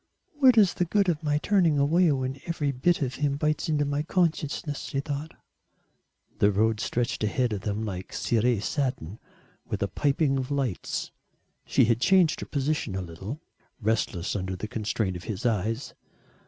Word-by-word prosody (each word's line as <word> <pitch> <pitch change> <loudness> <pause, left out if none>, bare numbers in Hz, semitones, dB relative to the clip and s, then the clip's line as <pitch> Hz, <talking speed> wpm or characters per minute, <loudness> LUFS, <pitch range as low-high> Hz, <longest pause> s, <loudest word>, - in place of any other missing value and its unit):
"What 265 -5 +5
is 200 -5 +6
the 180 - 0
good 195 +2 +2
of 160 -3 0
my 150 -2 +1
turning 170 -2 +2
away 160 +4 +4
when 135 0 -2
every 150 -4 0
bit 145 +5 +1
of 130 -1 -2
him 140 -1 +1
bites 155 +3 0
into 150 -2 +2
my 145 +1 -1
consciousness?" 155 -3 -1
she 135 - -3
thought. 145 +2 -4 1.0
The 105 - +5
road 110 +2 +2
stretched 120 +1 -1
ahead 120 +2 +1
of 100 - -3
them 105 +2 -2
like 95 -3 -5
ciré 115 -2 +1
satin 125 - -2 0.4
with - - -3
a - - +1
piping 140 -1 +1
of 130 - -4
lights. 135 -9 -2 0.6
She - - +4
had 115 +1 +1
changed 185 -2 +4
her - - -6
position 140 -7 -1
a 95 - -2
little, 95 - -7 0.4
restless 105 -5 -1
under 95 -1 -2
the 95 +4 -5
constraint 105 -3 -2
of 85 - -11
his 105 +1 -5
eyes. 115 +2 -1
135 Hz, 170 wpm, -27 LUFS, 110-155 Hz, 1.0 s, is